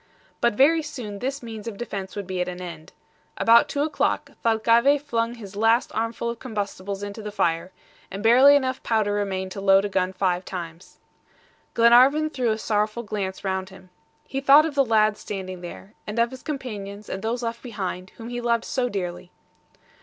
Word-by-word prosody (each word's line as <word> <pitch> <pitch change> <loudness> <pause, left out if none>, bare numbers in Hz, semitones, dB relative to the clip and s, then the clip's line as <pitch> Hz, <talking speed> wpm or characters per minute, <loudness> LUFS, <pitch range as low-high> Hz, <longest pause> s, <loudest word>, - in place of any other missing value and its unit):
But 235 -3 +2
very 315 +7 +5
soon 230 -9 -7
this 270 +3 -3
means 225 -2 -8
of 215 -3 -5
defense 195 -5 -6
would 205 -1 -4
be 185 -1 -3
at 180 - -1
an 180 0 -6
end. 175 -3 -9 0.5
About 230 +1 +5
two 285 - 0
o'clock, 300 -1 -1
Thalcave 230 +5 +4
flung 235 -4 -2
his 205 -4 -10
last 225 +3 +2
armful 230 +1 -2
of 235 - -9
combustibles 200 -4 -4
into 205 +2 -6
the 210 0 -6
fire, 170 -2 0 0.4
and 195 +2 -6
barely 260 +5 +7
enough 260 -2 0
powder 215 -3 +1
remained 190 -2 -2
to 195 - -6
load 195 0 +5
a - - -2
gun 185 -1 0
five 185 -1 0
times. 170 -2 -8 0.8
Glenarvan 255 +7 +5
threw 250 -5 0
a 215 - +1
sorrowful 215 +1 -1
glance 195 -3 -4
round 190 -1 -2
him. 185 -1 -16 0.3
He 270 - -4
thought 285 +3 +7
of 320 - -3
the 280 -1 +4
lad 215 -3 +3
standing 185 -3 -6
there, 185 +3 -10
and 210 +2 -5
of 235 0 +2
his 260 - -9
companions 210 -8 -6
and 190 - -5
those 235 +3 -2
left 230 0 -4
behind, 190 -6 -5
whom 230 0 -8
he 245 0 -4
loved 235 -1 +1
so 250 -2 -1
dearly. 180 -4 -5
215 Hz, 190 wpm, -24 LUFS, 195-240 Hz, 0.8 s, barely